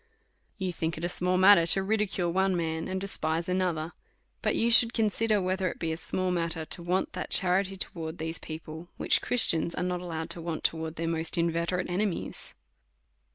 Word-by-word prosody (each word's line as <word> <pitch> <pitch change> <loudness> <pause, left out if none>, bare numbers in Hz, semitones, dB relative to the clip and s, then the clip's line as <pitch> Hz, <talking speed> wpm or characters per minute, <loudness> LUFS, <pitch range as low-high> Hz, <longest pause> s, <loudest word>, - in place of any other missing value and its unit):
You 190 -3 -3
think 165 -1 -3
it 165 - -3
a - - -1
small 180 +1 0
matter 185 -3 +6
to 195 +3 +5
ridicule 195 -4 -1
one 190 0 +1
man, 160 -1 -2
and 190 0 -3
despise 165 -4 0
another; 180 -3 -1 0.5
but - - 0
you 235 +1 +1
should 230 0 +5
consider, 220 -1 +1
whether 185 0 -1
it - - -8
be 165 -1 -3
a - - -2
small 185 +2 -2
matter 165 -2 -2
to 170 - +3
want 180 +2 -1
that - - -5
charity 190 +1 +2
towards 165 -2 -4
these 160 +1 -4
people, 160 +1 -9
which - - +3
Christians 170 -9 +3
are 180 - -2
not 180 0 -2
allowed 165 -2 -4
to 170 - +3
want 165 -1 -4
to - - +2
wards 160 0 -5
their 165 0 -3
most 165 +1 0
inveterate 170 +2 0
enemies. 185 +1 -2
175 Hz, 195 wpm, -28 LUFS, 165-190 Hz, 0.5 s, matter